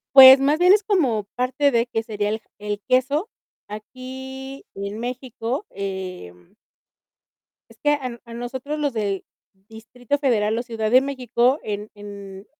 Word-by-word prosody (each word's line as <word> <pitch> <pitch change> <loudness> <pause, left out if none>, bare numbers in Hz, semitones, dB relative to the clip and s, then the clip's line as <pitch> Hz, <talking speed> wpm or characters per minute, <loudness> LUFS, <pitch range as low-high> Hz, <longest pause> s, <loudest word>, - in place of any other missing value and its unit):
Pues, 265 0 +12
más 290 +3 +2
bien 360 +2 +6
es 415 +1 +5
como 280 - +1
parte 260 +3 +2
de, 235 -2 +2
¿qué 225 - 0
sería, 210 -2 -2
el 220 - -2 0.2
el 205 0 -4
queso? 275 - +2 0.4
Aquí, 265 +5 -8
en 200 +2 -5
México, 245 - -4
em 185 - -7 1.2
es 230 - -17
que 295 - +3
a 255 -5 -3
a 235 -1 -10
nosotros 260 +5 -5
los 290 -2 0
del 200 -4 -2 0.4
Distrito 240 +4 -4
Federal 225 -6 +1
o - - -1
Ciudad 225 -3 -3
de 255 - +7
México, 260 0 +1
en 210 0 -5
en 200 -1 -10
240 Hz, 150 wpm, -23 LUFS, 210-265 Hz, 1.2 s, Pues